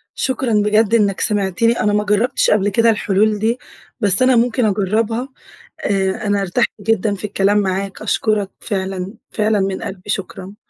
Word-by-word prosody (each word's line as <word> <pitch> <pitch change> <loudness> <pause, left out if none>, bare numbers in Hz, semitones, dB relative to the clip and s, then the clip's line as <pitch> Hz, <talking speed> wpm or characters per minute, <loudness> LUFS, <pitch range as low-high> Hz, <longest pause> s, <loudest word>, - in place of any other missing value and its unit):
شكرًا 260 -2 -1
بجد 210 +1 +2
إنّك 200 -4 +1
سمعتني، 210 +2 +1
أنا 210 - +1
ما 210 0 +1
جرّبتش 210 +4 +1
قبل 205 -1 +2
كده 230 +3 +3
الحلول 210 0 +1
دي، 225 +3 0 0.4
بس 200 -3 +2
أنا 255 0 +4
ممكن 240 +1 +2
أجرّبها. 220 +5 0 0.6
آآ 195 0 -1
أنا 205 0 +1
ارتحت 195 +5 0
جدًا 210 0 0
في 200 - -8
الكلام 205 0 +1
معاك، 195 0 -2
أشكرك 210 -3 0
فعلًا، 190 0 -4 0.2
فعلًا 215 -1 +1
من 190 0 -2
قلبي 190 +1 -7
شكرًا. 195 0 -5
205 Hz, 155 wpm, -18 LUFS, 195-225 Hz, 0.6 s, أنا